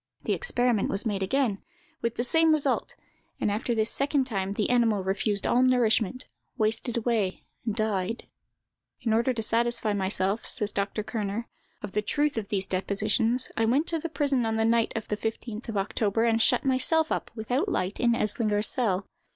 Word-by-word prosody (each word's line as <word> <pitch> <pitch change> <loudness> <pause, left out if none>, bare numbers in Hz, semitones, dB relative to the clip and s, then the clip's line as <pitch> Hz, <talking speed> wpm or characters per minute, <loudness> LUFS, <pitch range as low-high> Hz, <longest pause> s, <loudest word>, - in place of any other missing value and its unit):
The - - 0
experiment 245 - +1
was 195 +4 0
made 205 -3 -1
again, 210 0 0 0.4
with 235 0 -1
the 240 - -1
same 320 +5 +4
result; 285 -3 0 0.4
and 210 - 0
after 230 +3 -1
this 220 0 +2
second 280 0 +1
time 195 -5 -2
the 210 +3 0
animal 225 -5 +2
refused 200 +2 -1
all 245 - +3
nourishment, 245 -2 +2 0.3
wasted 225 +2 0
away, 220 -5 -1 0.2
and 215 - 0
died. 215 -1 -1 0.8
"In 230 -3 0
order 235 +3 +2
to 225 -3 -3
satisfy 230 -1 +1
myself," 195 +1 0
says 210 -4 +2
Dr. 200 +2 -2
Kerner, 215 0 -3 0.4
"of 205 - -5
the 210 - 0
truth 290 +7 0
of 220 -3 -3
these 195 -2 -1
depositions, 215 +6 0
I 225 - +1
went 265 +8 +2
to 330 - -1
the 335 - -4
prison 285 -5 +1
on 225 -1 0
the 225 0 +1
night 230 0 +2
of 225 - -4
the 210 - -2
15th 225 +1 -5
of 220 - -3
October, 205 +2 0
and 225 -1 +2
shut - - +3
myself 315 +5 +3
up - - -2
without 250 - -1
light 190 - -2
in 235 -1 +3
Eslinger's 210 -1 +1
cell. 205 -7 +1
225 Hz, 185 wpm, -27 LUFS, 205-245 Hz, 0.8 s, same